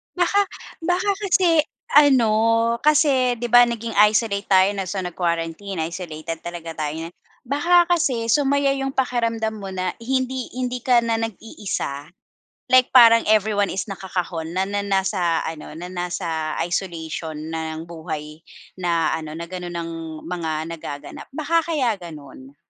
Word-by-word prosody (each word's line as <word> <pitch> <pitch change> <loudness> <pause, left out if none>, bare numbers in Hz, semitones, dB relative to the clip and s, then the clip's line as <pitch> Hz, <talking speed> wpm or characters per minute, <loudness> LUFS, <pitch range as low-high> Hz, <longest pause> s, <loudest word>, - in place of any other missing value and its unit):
Baka 360 +3 +3 0.4
baka 360 +4 +1
kasi 350 -5 +4 0.3
ano, 265 -7 +6 0.5
kasi 275 -5 +4
'di 240 - -2
ba 245 0 +9
naging 230 -1 -4 0.2
isolate 205 -2 0
tayo 190 0 +5
na 195 - -2
so 195 +1 -3
nag-quarantine, 170 +1 -3
isolated 165 -2 -6
talaga 170 -1 -6
tayo 150 0 -2
niyan. 170 - -14 0.3
Baka 340 +6 +4
kasi 260 -10 +1
sumaya 280 -1 +3
'yung 270 0 -2
pakiramdam 230 -4 0
mo 200 -2 -7
na 185 -1 -2
hindi 260 0 -2
hindi 250 -1 -2
ka 245 -2 +5
na 230 -1 0
nag-iisa, 195 -9 -5 0.6
like 255 0 +5
parang 230 -2 +8
everyone 210 -1 +2
is 190 +2 -3
nakakahon 180 -4 -4
na 185 - +1
na 205 +1 -2
nasa 190 -4 +1
ano 160 -1 -6
na 175 - -6
nasa 170 -3 -3
isolation 165 -3 -4 0.2
ng 160 0 -4
buhay 155 -2 -7 0.4
na 170 -3 +1
ano 155 -1 -7
na 170 +1 -6
gano'n 180 -1 -6
ang 165 0 -4 0.3
mga 170 -2 -3 0.2
nagaganap, 145 -3 -8
baka 325 +3 +1
kaya 255 -8 +1
gano'n. 145 -5 -11
195 Hz, 140 wpm, -22 LUFS, 165-250 Hz, 0.6 s, ba